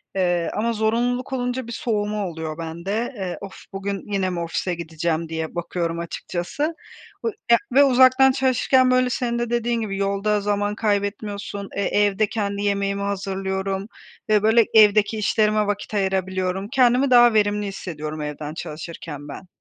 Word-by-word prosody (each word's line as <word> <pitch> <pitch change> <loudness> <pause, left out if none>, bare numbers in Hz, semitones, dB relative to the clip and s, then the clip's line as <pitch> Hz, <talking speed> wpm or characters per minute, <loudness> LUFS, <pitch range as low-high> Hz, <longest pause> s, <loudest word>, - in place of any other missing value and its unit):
eee, 175 -2 +1
ama 230 +2 0
zorunluluk 240 +4 0
olunca 250 -1 -2
bir - - -7
soğuma 210 -3 -1
oluyor 160 -2 -5
bende, 180 +10 -3
eee, 185 -3 -4
of, 195 -1 -9 0.2
bugün 200 +1 -4
yine 190 -2 +1
mi 175 -1 -3
ofise 170 +1 -2
gideceğim 165 0 -2
diye 160 0 -4
bakıyorum 170 -1 -2
açıkçası 175 - -4 0.6
ı - - +2 0.2
ya 235 - +8 0.2
ve 280 - +7
uzaktan 260 0 +6
çalışırken, 260 0 +3
böyle, 255 0 +3
senin 235 -1 -1
de 240 -1 -2
dediğin 235 -1 0
gibi 195 -3 -3
yolda 200 +1 0
zaman 205 0 0
kaybetmiyorsun, 205 -1 -2
e, 200 - -1
evde 205 +1 +2
kendi 200 -2 -2
yemeğimi 200 0 0
hazırlıyorum 195 0 -2 0.4
ve, 210 -1 +4
böyle, 225 0 +5
evdeki 215 0 +5
işlerime 215 0 +2
vakit 205 +1 -3
ayırabiliyorum. 190 -1 -1
Kendimi 255 +1 +4
daha 240 -1 +7
verimli 205 -1 +2
hissediyorum 155 -5 -6
evden 150 0 -5
çalışırken 155 -2 -7
ben. 150 +6 -9
200 Hz, 150 wpm, -23 LUFS, 185-225 Hz, 0.6 s, ya